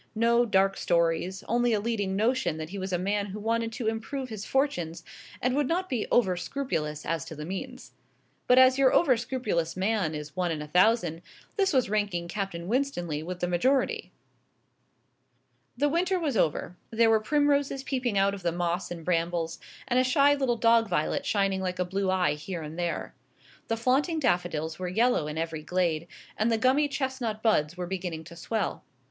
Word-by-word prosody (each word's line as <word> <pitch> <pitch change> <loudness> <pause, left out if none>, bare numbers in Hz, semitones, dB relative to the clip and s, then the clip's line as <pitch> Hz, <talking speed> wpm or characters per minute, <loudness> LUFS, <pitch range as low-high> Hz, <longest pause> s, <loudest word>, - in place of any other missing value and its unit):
No 235 +2 +3
dark 195 -1 +2
stories; 170 +2 0
only 240 +1 +2
a 210 - +2
leading 205 -3 -1
notion 215 -6 +1
that 155 +1 -6
he 200 - -5
was 190 0 -4
a 180 - +1
man 200 +3 -1
who 200 +2 -6
wanted 230 +1 -1
to 245 -1 -4
improve 240 +4 -3
his 215 -3 -6
fortunes, 175 - -1 0.4
and 250 +1 0
would 290 -2 +1
not 365 +4 -1
be 245 -5 -1
over 190 -7 +3
scrupulous 170 - -3
as 165 0 -1
to 160 - -8
the 150 0 -6
means. 250 +9 -6 0.6
But 250 - +5
as 260 +1 +6
your 265 -1 +5
over 275 -7 +4
scrupulous 220 -9 -2
man 190 -5 0
is 150 +1 -7
one 180 -1 0
in 155 - -2
a 150 - -6
thousand, 180 0 +3 0.3
this 390 -2 +2
was 260 -5 +2
ranking 200 -4 -1
Captain 175 -3 -4
Winstanley 190 - -1
with 180 +2 -6
the 175 - +1
majority. 255 +11 +1 1.7
The 290 +3 +2
winter 360 +5 +1
was 300 -7 -1
over; 170 -1 0
there 225 0 +3
were 220 - +5
primroses 285 +2 +1
peeping 255 -6 -1
out 195 +1 +3
of 200 - -7
the 170 -1 0
moss 175 +1 -2
and 170 -2 -7
brambles, 170 -1 -1 0.3
and 250 0 +2
a - - +4
shy 280 +3 +4
little 265 -4 0
dog 230 -1 +4
violet 175 -4 -1
shining 195 -2 +1
like 185 -1 -2
a 180 - 0
blue 190 +2 -1
eye 185 -3 +2
here 165 +3 -6
and 155 +1 -7
there. 175 -1 -3 0.5
The 225 - -1
flaunting 270 +8 +1
daffodils 175 - -1
were 185 - -3
yellow 225 -4 +2
in 150 +1 -5
every 165 -1 -3
glade, 170 -1 -1 0.3
and 220 +2 +1
the 225 - +2
gummy 260 +6 +3
chestnut 260 -6 -3
buds 180 -7 +2
were 180 - -3
beginning 175 -3 -4
to 170 +1 -12
swell. 205 +3 -3
200 Hz, 190 wpm, -28 LUFS, 175-250 Hz, 1.7 s, as